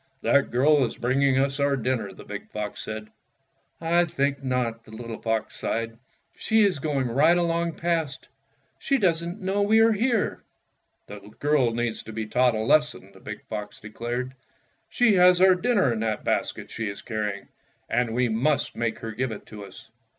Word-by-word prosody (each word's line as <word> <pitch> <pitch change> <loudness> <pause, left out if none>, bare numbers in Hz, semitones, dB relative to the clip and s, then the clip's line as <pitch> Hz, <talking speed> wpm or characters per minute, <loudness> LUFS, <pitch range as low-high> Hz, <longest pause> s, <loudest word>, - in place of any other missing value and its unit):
''That 140 - +3
girl 140 +3 +4
is 120 - -3
bringing 130 +2 +2
us 140 +1 +1
our 140 -1 +2
dinner,'' 120 -5 -2
the 95 - -12
big 105 0 -8
fox 105 -1 -5
said. 110 0 -6 0.7
"I 170 +1 +2
think 140 -3 -1
not," 125 -3 -1
the - - -19
little 115 0 -8
fox 110 -1 -2
sighed. 115 0 -2 0.4
"She 220 0 +2
is 195 -7 +2
going 140 -3 -1
right 155 +8 +4
along 170 -1 0
past. 165 -6 -2 0.5
She 275 - +1
does 170 -7 +1
n't 175 +5 -6
know 190 +2 0
we 215 +2 +4
are 225 0 +6
here." 230 +1 0 0.6
"The 105 - -9 0.2
girl 145 -4 +2
needs 120 -1 -2
to 110 - -10
be 110 0 -3
taught 125 +2 +2
a 110 - -1
lesson," 150 +6 +2
the - - -16
big - - -8
fox 105 -1 -6
declared. 120 +4 -5 0.3
" - - -43
She 245 -3 +5
has 180 -1 +6
our 190 0 +7
dinner 185 - +2
in 110 - -3
that 110 -1 -2
basket - - -2
she 115 -2 -3
is 100 - -8
carrying, 105 -3 -4 0.4
and 115 -1 0
we 125 0 +2
must 130 +7 0
make 115 -1 -2
her 115 - -5
give 120 +3 -2
it 105 - -8
to 105 -2 -10
us." 110 +4 -13
130 Hz, 185 wpm, -25 LUFS, 115-170 Hz, 0.7 s, our